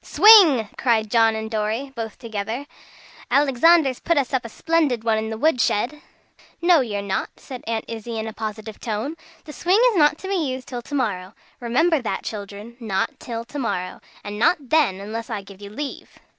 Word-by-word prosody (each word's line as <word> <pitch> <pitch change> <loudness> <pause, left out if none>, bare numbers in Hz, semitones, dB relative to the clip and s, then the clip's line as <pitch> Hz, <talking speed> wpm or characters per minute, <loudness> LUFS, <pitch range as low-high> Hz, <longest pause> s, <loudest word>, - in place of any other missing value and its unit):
"Swing!" 360 - +7
cried 220 -4 +1
John 225 -1 +4
and 220 0 -5
Dorry 220 +5 -2
both 225 -2 -5
together. 225 +3 -5 0.6
"Alexander's 280 0 +4
put 335 -1 0
us 275 -3 0
up 260 - +1
a 230 - -7
splendid 305 -4 0
one 225 -1 +2
in 220 0 -4
the 220 - -4
wood 295 -1 +2
shed." 255 +9 0 0.6
"No 345 -1 +5
you're 205 -5 -3
not," 195 -1 -2
said 255 -2 -9
Aunt 225 -1 -2
Izzie 230 0 -6
in 220 - -3
a 220 - -6
positive 215 0 -6
tone, 230 +7 -3 0.3
"the 300 - -9
swing 365 +7 +2
is 415 - -2
not 295 -1 +4
to 380 - -8
be 395 - -2
used 260 -6 -3
till 245 -2 -5
to 285 - -7
morrow. 200 -7 -2 0.2
Remember 280 +6 +2
that, 195 -5 -3
children. 210 +2 -7
Not 215 -5 -2
till 230 -1 -6
to 280 +4 -7
morrow. 185 -7 -3 0.2
And 205 0 -6
not 285 +1 +1
then, 285 -12 +3
unless 225 +4 -6
I 210 -4 -4
give 195 0 -14
you 200 - -8
leave." 275 +7 -7
235 Hz, 195 wpm, -22 LUFS, 215-285 Hz, 0.6 s, Swing